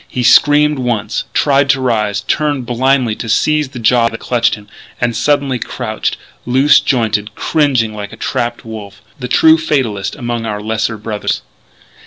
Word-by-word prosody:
He 125 - -3
screamed 145 +3 +4
once, 110 -4 -2
tried 140 -1 +2
to 135 -1 +3
rise, 105 -5 0
turned 145 +2 -1
blindly 125 -1 +1
to 115 - -6
seize 150 +5 +1
the 130 - -10
jaws 115 0 +3
that 115 - -8
clutched 115 -2 +1
him; 105 -1 -15 0.3
and 120 -2 0
suddenly 140 0 +1
crouched, 110 -3 -3 0.3
loose 135 +4 +4
jointed, 110 -4 -1
cringing 130 -8 +1
like 105 -1 -7
a - - -11
trapped 120 0 -3
wolf 105 -2 -9 0.2
the 125 - -4
true 160 +5 +5
fatalist 130 -11 -1
among 120 -4 -4
our 105 -1 -3
lesser 110 +1 -2
brothers. 105 0 -3
120 Hz, 160 wpm, -15 LUFS, 110-135 Hz, 0.3 s, true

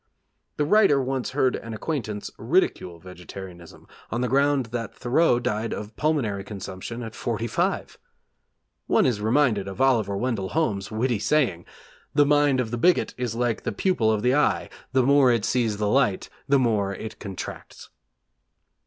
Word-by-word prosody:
The 150 - +1
writer 195 -5 +4
once 130 -1 -2
heard 130 -1 +1
an 115 -1 -6
acquaintance 110 -6 -4
ridicule 85 -2 0
vegetarianism 90 0 -11 0.2
on 120 - -2
the 125 - +1
ground 140 +1 +2
that 115 -3 -4
Thoreau 125 +2 +2
died 110 -1 -2
of 105 +1 -8
pulmonary 125 -11 0
consumption 100 +3 -7
at 110 -1 -7
forty 115 -1 -3
five! 115 - -2 0.9
One - - +3
is 115 -5 0
reminded 110 -3 +2
of 95 - -7
Oliver 115 -7 +2
Wendell 110 -5 -2
Holmes' 100 -11 0
witty 115 +1 0
saying: 110 - +1 0.5
'The 145 - +5
mind 145 -2 +3
of 115 -3 -2
the 120 - -3
bigot 180 +7 +3
is 120 -3 -3
like 120 -1 -1
the - - -3
pupil 125 - +1
of 110 -1 -1
the 125 +1 +3
eye: 150 +1 +1 0.2
the 130 0 +3
more 140 -1 +5
it 115 -3 +1
sees 115 -4 0
the 105 0 -1
light, 105 -4 +1 0.2
the 140 - +5
more 105 -6 +1
it 110 +3 -8
contracts.' 100 -3 -8
115 Hz, 160 wpm, -25 LUFS, 105-135 Hz, 0.9 s, The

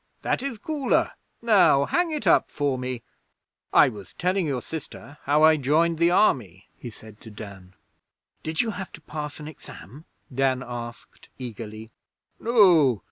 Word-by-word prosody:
'That - - 0
is 270 -4 -4
cooler. 285 +4 0 0.3
Now 195 -11 +5
hang 350 - +1
it 305 -8 -4
up 170 - +4
for 145 -2 -1
me.... 125 -2 -5 0.7
'I - - +6
was 105 -6 -11
telling 185 -1 0
your 130 -4 -2
sister 150 -2 -9
how 150 +2 +3
I 160 0 +6
joined 160 +4 +1
the 170 0 +4
Army,' 125 - +1
he 120 - -9
said 110 -1 -14
to 115 - -11
Dan. 100 -4 -11 0.7
'Did 160 0 -1
you 230 - -2
have 190 -2 -7
to 165 - -11
pass 150 -1 -7
an 150 - -8
Exam?' 145 - -12 0.3
Dan 130 0 +1
asked 120 -1 -9
eagerly. 110 -2 -8 0.5
'No. 175 - +4
145 Hz, 155 wpm, -25 LUFS, 120-175 Hz, 0.7 s, I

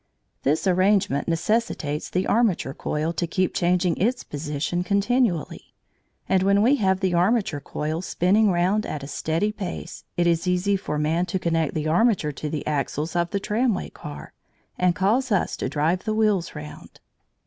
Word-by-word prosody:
This 150 +7 +1
arrangement 185 -5 +2
necessitates 165 -4 -1
the 185 +1 0
armature 205 - +1
coil 155 +4 -2
to 170 0 -2
keep 185 +3 0
changing 180 -2 +1
its 245 +6 0
position 150 +4 -3
continually, 200 - 0 0.5
and 190 -1 +3
when 200 +2 +3
we 270 +5 +4
have 190 -4 +1
the 190 -2 +1
armature 180 -2 +2
coil 155 +3 -3
spinning 200 +4 +2
round 185 +4 +1
at 145 -2 -5
a - - -6
steady 165 +8 -1
pace, 190 -4 -6
it 175 - +2
is 170 +1 +1
easy 180 +3 +2
for 170 -6 -3
man 160 +4 0
to 190 - -1
connect 165 -4 0
the 155 -1 -1
armature 175 -2 +2
to 150 +2 -5
the 150 -1 -4
axles 150 +2 -2
of 170 0 +1
the 200 - -1
tramway 215 +1 -1
car 150 -1 -9 0.4
and 180 -1 +2
cause 230 +8 +1
us 200 - +1
to - - -2
drive 155 +6 0
the 215 -1 0
wheels 210 -5 +1
round. 75 0 -10
180 Hz, 170 wpm, -24 LUFS, 155-200 Hz, 0.5 s, we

